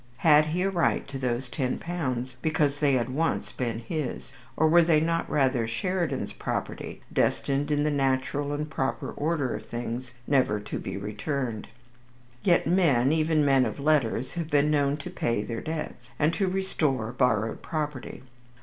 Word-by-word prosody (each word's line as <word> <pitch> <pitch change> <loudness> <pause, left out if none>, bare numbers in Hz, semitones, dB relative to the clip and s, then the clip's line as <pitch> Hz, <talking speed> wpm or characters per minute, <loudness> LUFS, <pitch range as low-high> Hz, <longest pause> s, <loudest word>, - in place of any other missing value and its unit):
Had 155 -1 +7
he 170 +4 -1
a 195 - +2
right 175 -3 +1
to 135 -1 -5
those 125 0 -1
ten 125 0 -2
pounds 130 -7 -3
because 145 -2 +1
they 145 -2 +3
had 125 -1 +1
once 160 +5 -1
been 120 -3 -2
his, 130 +4 -4 0.3
or 160 - +4
were 170 +2 +6
they 165 -2 +4
not 165 +1 0
rather 130 -5 +2
Sheridan's 170 +10 -2
property, - - -4
destined 140 +1 +1
in 145 -1 +2
the 150 - +1
natural 140 +1 0
and 150 +1 -2
proper 135 -3 -2
order 150 -4 -1
of - - -6
things 120 +1 -5
never 130 -7 +2
to 105 - -5
be - - -5
returned. 110 +3 -3 0.7
Yet 175 -2 +3
men, 150 -8 +3
even 155 -1 +2
men 135 -2 +5
of - - -3
letters, 140 -4 +1
have 170 -3 -4
been 145 0 +3
known 145 -1 +2
to 140 - -7
pay 115 -3 -1
their 115 +1 -4
debts, 160 -1 -5
and 155 +2 +2
to 195 0 0
restore 155 - 0
borrowed 115 -4 +1
property. 150 -6 -4
140 Hz, 170 wpm, -27 LUFS, 125-155 Hz, 0.7 s, Had